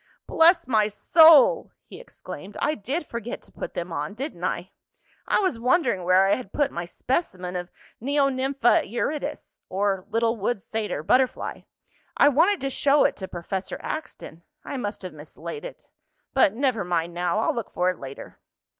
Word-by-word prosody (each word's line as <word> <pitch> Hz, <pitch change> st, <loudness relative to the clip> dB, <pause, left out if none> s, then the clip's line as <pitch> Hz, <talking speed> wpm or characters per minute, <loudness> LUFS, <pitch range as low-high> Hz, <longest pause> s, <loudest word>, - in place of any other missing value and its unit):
"Bless 335 Hz, +1 st, +4 dB
my 215 Hz, -4 st, +3 dB
soul!" 320 Hz, -, +6 dB
he -, -, -12 dB
exclaimed. 205 Hz, -, -10 dB
"I 300 Hz, -, +1 dB
did 280 Hz, -, -3 dB
forget 235 Hz, -2 st, -6 dB
to -, -, -15 dB
put -, -, -7 dB
them 170 Hz, 0 st, -4 dB
on; 150 Hz, +6 st, -4 dB
didn't 275 Hz, +6 st, -6 dB
I? -, -, -2 dB, 0.6 s
I -, -, +2 dB
was 370 Hz, -, 0 dB
wondering 240 Hz, -, +2 dB
where 185 Hz, +2 st, +4 dB
I 195 Hz, -, +3 dB
had 245 Hz, -7 st, -4 dB
put 290 Hz, -2 st, 0 dB
my 170 Hz, 0 st, -4 dB
specimen 185 Hz, -, -3 dB
of 180 Hz, 0 st, -4 dB, 0.3 s
Neonympha 270 Hz, -3 st, +2 dB
eurytus, 285 Hz, +5 st, -4 dB
or 195 Hz, 0 st, -1 dB
little 230 Hz, +1 st, +1 dB
wood 210 Hz, +2 st, -1 dB
satyr 210 Hz, -7 st, -4 dB
butterfly. 255 Hz, +8 st, +1 dB, 0.6 s
I 285 Hz, -, +6 dB
wanted 335 Hz, +8 st, +3 dB
to 275 Hz, 0 st, -2 dB
show 285 Hz, +2 st, +3 dB
it -, -, +2 dB
to 190 Hz, -, -5 dB
Professor 185 Hz, +2 st, -5 dB
Axton. 300 Hz, -, -6 dB, 0.2 s
I -, -, -5 dB
must 205 Hz, -6 st, -4 dB
have 180 Hz, -3 st, -6 dB
mislaid 155 Hz, -, -9 dB
it. -, -, -10 dB, 0.5 s
But 240 Hz, -7 st, +4 dB
never 250 Hz, -5 st, 0 dB
mind 170 Hz, -1 st, -1 dB
now. 175 Hz, +2 st, -1 dB
I'll 220 Hz, -, +1 dB
look 235 Hz, -3 st, -4 dB
for 180 Hz, +1 st, +1 dB
it 185 Hz, -, -11 dB
later." 135 Hz, 0 st, -10 dB
230 Hz, 170 wpm, -25 LUFS, 185-280 Hz, 0.6 s, soul